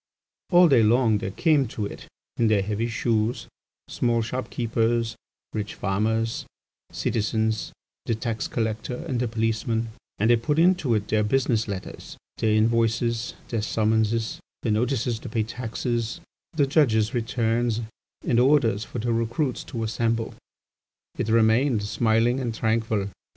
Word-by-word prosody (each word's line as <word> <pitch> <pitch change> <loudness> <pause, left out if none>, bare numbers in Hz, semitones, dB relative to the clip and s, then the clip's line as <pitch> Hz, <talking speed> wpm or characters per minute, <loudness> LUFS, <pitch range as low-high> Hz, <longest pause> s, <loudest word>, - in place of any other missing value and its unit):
"All 180 -1 +7
day 135 -7 +5
long 110 -1 +3
there 95 - -3
came 145 - +2
to 110 -2 -4
it, - - -8 0.3
in 115 - +3
their 105 -2 +3
heavy 105 +3 -1
shoes, 115 0 -1 0.4
small 115 -1 0
shop 125 +3 -4
keepers, 115 -1 0 0.4
rich 105 0 -4
farmers, 110 +3 -1 0.4
citizens, 110 0 -1 0.4
the 115 - +1
tax 115 0 -3
collector 110 +1 -2
and 125 -3 -1
the 125 - 0
policeman, 115 0 -1 0.3
and 110 +3 +3
they 120 - +6
put 145 +6 -1
into 165 -8 +3
it 105 -1 -1
their 110 0 +2
business 115 -1 +1
letters, 100 -2 -7 0.2
their 110 - +2
invoices, 115 +1 +1
their 115 -2 -1
summonses 110 +1 0 0.2
their 115 - +1
notices 120 +1 0
to 125 - -8
pay 110 0 0
taxes, 120 +3 -3 0.3
the 150 -3 +3
judges' 120 -6 +2
returns, 115 -1 0 0.4
and 120 - +3
orders 125 -6 +3
for 120 - -8
the 120 +1 0
recruits 115 +4 -1
to 115 -2 -4
assemble. 115 +1 -1 0.9
It - - -1
remained 115 +1 +3
smiling 115 +4 +2
and 120 -4 -3
tranquil. 110 -3 0
115 Hz, 140 wpm, -25 LUFS, 110-120 Hz, 0.9 s, All